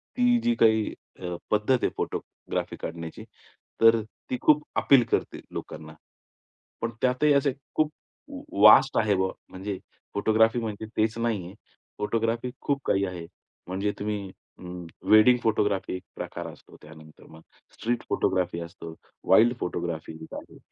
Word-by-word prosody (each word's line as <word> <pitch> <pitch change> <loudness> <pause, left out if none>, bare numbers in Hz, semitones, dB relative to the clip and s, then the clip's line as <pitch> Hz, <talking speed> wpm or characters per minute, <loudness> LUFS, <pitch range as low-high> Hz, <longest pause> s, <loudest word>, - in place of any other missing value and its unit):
ती 245 -1 +4
जी 240 0 +2
काही 110 - +3 0.3
अ, 90 -2 -4 0.2
पद्धत 105 +5 +3
आहे - - +3
फोटोग्राफी - - -4
काढण्याची, 85 -1 -6 0.6
तर 115 0 +6 0.3
ती 125 - -1
खूप 150 0 +4 0.2
अपील 135 -4 +6
करते - - 0
लोकांना. 80 0 -7 0.9
पण 115 - -1
त्यातही 130 +4 +3
असे 140 -1 +2 0.2
खूप 155 -1 +2 0.7
वास्ट 130 +5 +8
आहे 105 -2 +2
बा 95 0 +1 0.2
म्हणजे 95 +1 -5 0.4
फोटोग्राफी 110 +3 +3
म्हणजे 110 -1 -4
तेच 110 +1 +1
नाहीये. 105 -6 -2 0.5
फोटोग्राफी 115 +3 -1
खूप 140 -1 -1
काही 100 0 +2
आहे. 90 -3 -6 0.4
म्हणजे 95 +3 -1
तुम्ही 105 -2 -3 0.3
अं, 90 -1 -8 0.2
वेडिंग 110 +4 +7
फोटोग्राफी 105 -3 +1
एक 90 - -7
प्रकार - - -6
असतो, - - -17
त्यानंतर 80 0 -15
मग 80 0 -14 0.3
स्ट्रीट 120 +1 -2
फोटोग्राफी 90 -2 0
असतो, 85 -1 -9 0.4
वाईल्ड 120 +2 +6
फोटोग्राफी 85 -2 -4
एक - - -11
आहे. - - -10
105 Hz, 135 wpm, -26 LUFS, 90-120 Hz, 0.9 s, वास्ट